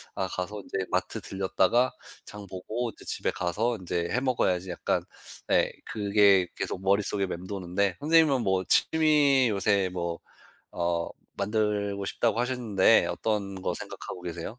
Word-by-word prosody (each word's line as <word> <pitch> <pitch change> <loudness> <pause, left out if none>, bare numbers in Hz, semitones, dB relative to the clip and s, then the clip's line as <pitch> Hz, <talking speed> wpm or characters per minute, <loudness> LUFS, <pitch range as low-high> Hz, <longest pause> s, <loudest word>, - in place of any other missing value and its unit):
'아 - - -1
가서 100 +3 -5
인제 95 0 -3
마트 95 +4 -1
들렸다가 95 +5 +1 0.3
장 105 -1 -9
보고 110 +6 -4
인제 - - -16
집에 - - -1
가서 105 +7 -1
인제 85 -2 -3
해 125 - +1
먹어야지.' 95 -8 0
약간 90 - -1 0.4
네 - - +3
그게 100 -3 +3
계속 95 - -4
머릿속에 100 0 +1
맴도는데 95 +1 -2
선생님은 155 -3 +4
뭐 95 -2 +1
취미 150 -5 +4
요새 100 -2 +1
뭐 85 -2 -3 0.6
어 85 -1 0 0.3
만들고 100 -1 -1
싶다고 115 +4 0
하셨는데 115 -5 +3
어떤 100 -3 -2
거 - - -1
생각하고 90 - -7
계세요? 85 +6 -6
100 Hz, 300 characters per minute, -27 LUFS, 95-115 Hz, 0.6 s, 선생님은